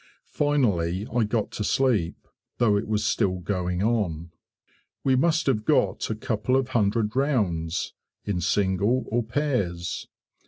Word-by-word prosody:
Finally 105 - +1
I 120 -3 +3
got 110 0 -1
to 105 - -3
sleep, 110 -8 0 0.3
though 115 -4 +3
it 100 - -1
was 105 -1 0
still 95 -3 +1
going 90 0 -2
on. 90 -8 -1 0.7
We 135 -1 +3
must 160 +4 +2
have 110 -6 +1
got - - +1
a - - -1
couple 130 - -1
of 135 -1 +1
hundred 110 -1 +1
rounds, 95 - 0 0.3
in 100 -4 -1
single 100 +6 +1
or 120 +2 +2
pairs. 110 - -2
105 Hz, 135 wpm, -25 LUFS, 90-125 Hz, 0.7 s, I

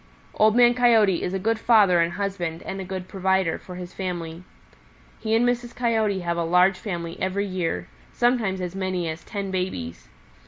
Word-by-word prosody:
"Old 215 +1 +3
Man 240 0 +6
Coyote 225 -7 +4
is 180 - -2
a 195 - -1
good 220 +4 0
father 205 -7 +5
and 170 0 +1
husband 180 -4 -3
and 195 0 -5
a - - -4
good 185 0 -6
provider 190 -2 0
for 180 - -10
his 180 0 -8
family. 175 -2 -5 0.8
He 220 0 0
and 240 +2 +3
Mrs. 240 -1 -2
Coyote 220 -5 0
have 170 -1 -2
a 170 - 0
large 180 +3 +3
family 170 -5 -5
every 190 +2 0
year, 170 - -3 0.2
sometimes 230 -6 +1
as 180 -1 -4
many 185 -3 -2
as 160 0 -5
ten 200 -3 -5
babies. 180 - -4
190 Hz, 185 wpm, -24 LUFS, 175-215 Hz, 0.8 s, Man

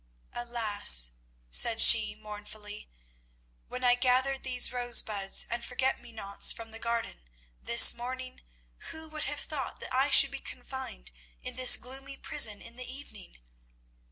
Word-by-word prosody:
"Alas," 215 - 0 0.4
said 225 - +5
she 215 -2 +7
mournfully, 210 0 -11 0.8
"when 250 0 -8
I 245 -1 +4
gathered 260 +2 -1
these 250 -2 +1
rosebuds 220 -5 0
and 235 0 -5
forget 260 +2 -3
me 240 - -14
nots 200 -3 +1
from 225 -1 -9
my 225 - -12
garden 230 - -6 0.3
this 235 - +8
morning, 255 +2 -9 0.5
who 320 0 -10
would 310 -1 -5
have 295 +1 -5
thought 280 -4 -7
that - - -9
I 265 +2 0
should 275 0 +5
be 275 - -8
confined 260 +1 -10 0.3
in 250 -1 -7
this 255 0 +3
gloomy 270 +2 -11
prison 210 -2 -1
in 230 +1 -13
the 255 0 -9
evening? 265 - -13
245 Hz, 145 wpm, -28 LUFS, 215-260 Hz, 0.8 s, this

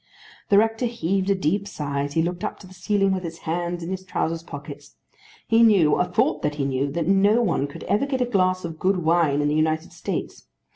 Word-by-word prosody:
The 200 - +5
rector 225 +3 +2
heaved 195 -4 -1
a 200 - +3
deep 190 +3 -1
sigh 145 -7 -3
as 145 0 -4
he 160 - +2
looked 175 +1 -3
up - - -3
to - - -12
the 185 - -14
ceiling 195 +2 +1
with 185 - -2
his 165 -2 -6
hands 175 +1 -2
in 170 - -5
his 190 0 -4
trowsers 165 -3 -2
pockets. 145 -2 -10 0.5
He 225 0 +4
knew, 200 -9 +5
or 180 - +2
thought 180 - 0
that 150 0 -1
he 140 -2 -1
knew, 135 +1 -1
that 165 -1 -2
no 200 +4 +4
one 165 -8 0
could 140 - -10
ever 245 +7 0
get 265 -2 -1
a 250 - +2
glass 185 -5 +1
of 160 -2 -7
good 190 +1 +2
wine 160 -3 +2
in 145 - +1
the 150 - +1
United 155 +1 0
States. - - -5
175 Hz, 235 wpm, -23 LUFS, 155-195 Hz, 0.5 s, The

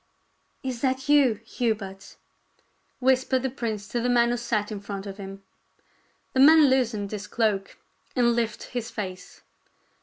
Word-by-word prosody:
"Is 255 -3 -4
that 265 +1 0
you, 280 -6 +5
Hubert?" 205 -5 -3 0.8
whispered 260 0 +2
the 265 - -1
prince 220 -5 -4
to 240 - -1
the 245 - 0
man 240 -1 +4
who 245 - 0
sat 230 -3 -1
in 210 - -4
front 200 -1 -6
of 195 -1 -7
him. 195 -1 -9 0.9
The 260 - 0
man 300 0 +7
loosened 225 -6 0
his 210 -1 -5
cloak 210 -4 -1 0.4
and 240 -2 +4
lifted 230 -2 -2
his 240 -2 -3
face. 190 -4 -7
235 Hz, 150 wpm, -26 LUFS, 205-255 Hz, 0.9 s, man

